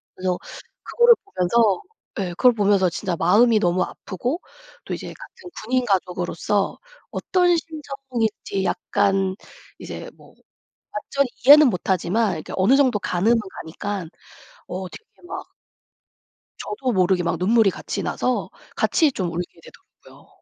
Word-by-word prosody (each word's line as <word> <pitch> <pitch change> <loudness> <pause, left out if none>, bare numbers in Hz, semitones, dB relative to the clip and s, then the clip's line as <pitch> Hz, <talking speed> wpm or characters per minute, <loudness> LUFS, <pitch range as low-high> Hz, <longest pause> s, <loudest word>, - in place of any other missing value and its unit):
그래서 185 -1 -1 0.5
그거를 475 0 +5
보면서 210 - +2 0.4
예 190 -2 -1
그걸 245 +8 +4
보면서 200 -4 +3
진짜 175 +1 -3
마음이 215 +7 +4
너무 180 -1 +2
아프고 250 - -4 0.4
또 - - -4
이제 - - -8
같은 465 -6 -12
군인 250 +2 0
가족으로서 185 0 -1 0.3
어떤 355 -1 +2
심정인지 275 -11 -4
약간 195 -2 0 0.4
이제 - - -7
뭐 - - -18 0.6
완전히 275 +6 -1 0.2
이해는 295 +2 +9
못 180 -6 -3
하지만 190 +5 +1
그러니까 160 -4 -5
어느 195 +8 +4
정도 260 -6 +3
가늠은 200 +7 +2 0.3
가니깐 185 +2 -5 0.6
어 185 +1 -5
되게 - - -12 0.2
막 - - -7 1.1
저도 265 -12 -3
모르게 185 -2 +2
막 170 - -1
눈물이 215 +3 +4
같이 - - -5
나서 250 -1 -1 0.3
같이 310 -4 +2
좀 185 -7 -3
울게 170 0 -5
되더라고요. - - -18
205 Hz, 290 characters per minute, -22 LUFS, 185-255 Hz, 1.1 s, 이해는